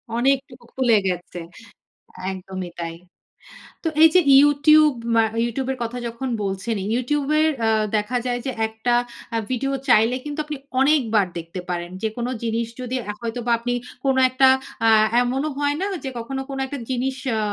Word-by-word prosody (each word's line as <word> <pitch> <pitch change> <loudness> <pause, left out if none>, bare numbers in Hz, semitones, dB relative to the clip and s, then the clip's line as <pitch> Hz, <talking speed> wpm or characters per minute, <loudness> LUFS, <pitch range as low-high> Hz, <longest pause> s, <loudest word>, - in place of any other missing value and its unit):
অনেকটুকু 260 -1 0
খুলে 245 -4 +3
গেছে। 180 -1 -4 0.9
একদমই 185 -1 -6
তাই। 165 0 -4 0.9
তো - - -1 0.2
এই - - +11
যে - - +9 0.2
YouTube 290 -1 +5 0.2
অ্যা 225 - +5 0.2
YouTube 260 +3 -3
এর - - -9
কথা 235 +2 -4
যখন 235 +3 -5
বলছেনই, 195 +1 -3
YouTube 280 +3 -1
এর 315 - +4 0.2
আ - - +3 0.3
দেখা 210 +4 -1
যায় 245 -1 -1
যে 265 - -1 0.2
একটা 220 +2 -2 0.4
আ - - +2
ভিডিও 275 +2 -1 0.2
চাইলে 230 +1 +5
কিন্তু 295 +1 -5
আপনি 300 -2 -5 0.2
অনেকবার 240 -9 +3
দেখতে 170 +2 -6
পারেন। 175 0 -3
যেকোনো 235 +3 -2
জিনিস 230 0 -1
যদি 250 +1 -4
অ্যা 210 - -4
হয়তো 230 +1 -4
বা - - +2
আপনি 245 +1 -2 0.3
কোনো 265 -1 +3
একটা 260 +1 +4 0.4
আ - - +6 0.3
এমনও 265 +5 -1
হয় 290 0 +1
না - - 0 0.2
যে - - -2
কখনো 265 +3 -4
কোনো 270 0 -4
একটা 275 0 -6
জিনিস 260 +1 -1 0.2
আ - - 0
245 Hz, 170 wpm, -22 LUFS, 220-270 Hz, 0.9 s, এই